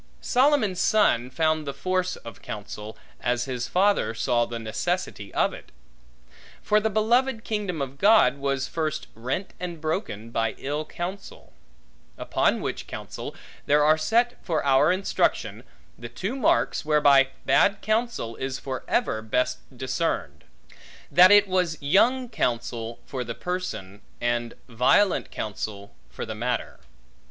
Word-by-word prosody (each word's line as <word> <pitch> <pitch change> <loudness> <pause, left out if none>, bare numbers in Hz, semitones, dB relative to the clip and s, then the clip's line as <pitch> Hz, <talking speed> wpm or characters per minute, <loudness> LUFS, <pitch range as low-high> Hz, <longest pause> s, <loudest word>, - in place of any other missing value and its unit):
Solomon's 255 -8 +2
son 125 - +3
found 155 +1 0
the 140 - -4
force 185 +4 -1
of 115 -4 -11
counsel, 105 +1 -7 0.2
as 125 0 0
his 125 -2 -3
father 195 - +2
saw 120 0 +1
the 120 - -6
necessity 115 - -3
of - - +2
it. - - -12 0.9
For 210 - +3
the 220 +1 0
beloved 225 +3 +1
kingdom 200 -8 -2
of 135 +1 -8
God, 210 -7 +5
was 140 -1 -1
first 155 -2 -2
rent, 130 - -4
and 175 -2 -5
broken, 155 - -3
by 115 -1 -1
ill 150 +3 -3
counsel; 185 +5 -7 0.6
upon - - +1
which - - -4
counsel, - - -7 0.3
there 150 +1 +4
are 155 +1 +5
set 235 +10 +1
for 160 -5 -1
our 140 +4 +4
instruction, 190 +2 0 0.4
the 120 0 -7
two 190 - -4
marks 265 - +1
whereby 145 -3 +5 0.2
bad 200 0 +3
counsel 215 - -1
is 130 0 -3
for 130 -2 -5
ever 110 - 0
best 110 +3 0 0.2
discerned; 130 - -2 0.7
that 180 +1 +8
it 205 0 +7
was 180 -4 0
young 235 - +3
counsel, 120 - -2
for 130 -2 -4
the 115 -1 -6
person; 180 - -5 0.2
and 120 -1 -1
violent 130 - +3
counsel, 105 -1 -5 0.2
for - - -6
the 110 - -5
matter. 120 +2 -3
150 Hz, 140 wpm, -25 LUFS, 120-195 Hz, 0.9 s, that